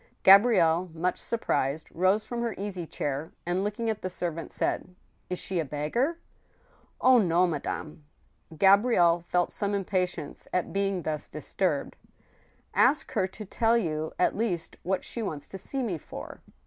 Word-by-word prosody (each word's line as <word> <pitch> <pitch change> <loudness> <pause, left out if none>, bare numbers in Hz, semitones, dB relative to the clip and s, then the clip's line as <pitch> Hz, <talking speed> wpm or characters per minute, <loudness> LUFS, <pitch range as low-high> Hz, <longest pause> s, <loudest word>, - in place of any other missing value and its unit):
Gabrielle, 185 -4 +6
much 180 +3 -1
surprised, 155 - -1
rose 190 +5 +2
from 235 +1 -4
her 235 -3 -2
easy 190 -4 -4
chair, 145 +2 -3
and, 175 +2 0
looking 210 +3 -2
at 220 -2 -1
the 185 - -3
servant, 170 -2 -4
said: 180 - -2 0.3
"Is 180 - -2
she 185 -1 -2
a - - +1
beggar?" 155 - -1 0.4
" - - -35 0.3
Oh! 255 -1 +7
no, 180 -3 +3
madame." 155 -1 -4 0.5
Gabrielle 195 -3 +5
felt 175 +1 0
some 200 0 0
impatience 180 -5 -2
at 180 - -1
being 195 -2 0
thus 155 -1 -3
disturbed. - - -2 0.5
" - - -35 0.3
Ask 275 +4 +3
her 185 - +1
to 215 +3 -9
tell 225 +4 +2
you, 155 -7 -2
at - - +2
least, 185 -7 -2
what 185 +1 -1
she 235 - -5
wants 155 -9 -4
to 195 - -7
see 265 +7 -3
me 185 -9 -2
for." - - -9
185 Hz, 160 wpm, -28 LUFS, 165-210 Hz, 0.5 s, Oh